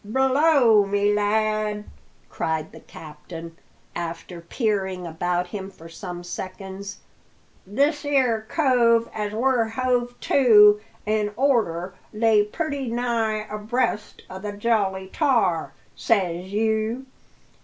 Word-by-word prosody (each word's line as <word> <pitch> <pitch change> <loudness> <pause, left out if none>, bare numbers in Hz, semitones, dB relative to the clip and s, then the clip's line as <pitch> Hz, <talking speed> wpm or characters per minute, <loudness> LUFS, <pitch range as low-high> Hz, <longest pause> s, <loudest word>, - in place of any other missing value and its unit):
"Blow 265 -1 +4
me, 205 +1 +2
lad!" 210 0 0 0.4
cried 160 -1 -3
the - - -12
captain, 165 +2 -11 0.4
after 170 +1 -6
peering 190 -2 -2
about 175 +2 -1
him 195 0 -6
for 165 -4 -14
some 175 +1 -8
seconds: 190 +2 -7 0.7
"this 285 - +1
'ere 260 -6 +2
cove 235 -6 +3
as 210 -1 -3
we're 240 +1 +1
hove 245 +1 -1
to 210 -6 +6 0.2
in 210 -1 0
orter 210 -10 +1 0.2
lay 215 -1 +3
purty 280 +4 -4
nigh 230 -3 -1
abreast 215 +1 -2
o' 185 - -8
the 205 +1 -5
Jolly 205 -3 0
Tar, 230 - +1 0.2
says 185 -4 0
you. 220 +4 0
210 Hz, 110 wpm, -23 LUFS, 190-240 Hz, 0.7 s, to